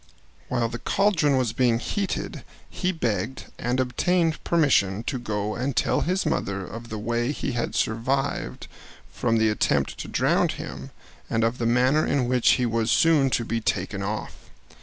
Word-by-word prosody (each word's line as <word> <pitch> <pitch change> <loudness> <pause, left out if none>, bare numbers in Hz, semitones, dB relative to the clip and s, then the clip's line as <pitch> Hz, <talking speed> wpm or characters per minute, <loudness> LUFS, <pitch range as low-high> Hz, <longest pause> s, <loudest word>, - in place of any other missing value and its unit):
While 120 -2 +1
the 120 +1 -6
caldron 165 -9 +2
was 125 -4 0
being 120 -1 +2
heated 195 - -3 0.2
he 185 -1 -1
begged 120 - -3
and 125 +2 -1
obtained 160 +6 +1
permission 115 - +2
to 130 +1 -3
go 105 -2 -2
and 130 +3 -2
tell - - +2
his 185 +3 0
mother 100 -1 -1
of 115 +4 -9
the 110 - -4
way 120 +4 -1
he 145 - -3
had 120 -1 -2
survived 130 +5 -1 0.5
from 115 -1 +1
the 110 0 +3
attempt 105 - 0
to - - -5
drown - - +2
him, - - -6 0.4
and 115 0 +1
of 115 +2 0
the 115 - 0
manner 130 +6 +3
in 135 -4 +1
which 125 -1 +4
he 125 - +1
was 115 -1 0
soon 155 -5 +4
to 120 -2 0
be 115 0 -2
taken - - -1
off. - - -4
120 Hz, 170 wpm, -25 LUFS, 115-140 Hz, 0.5 s, which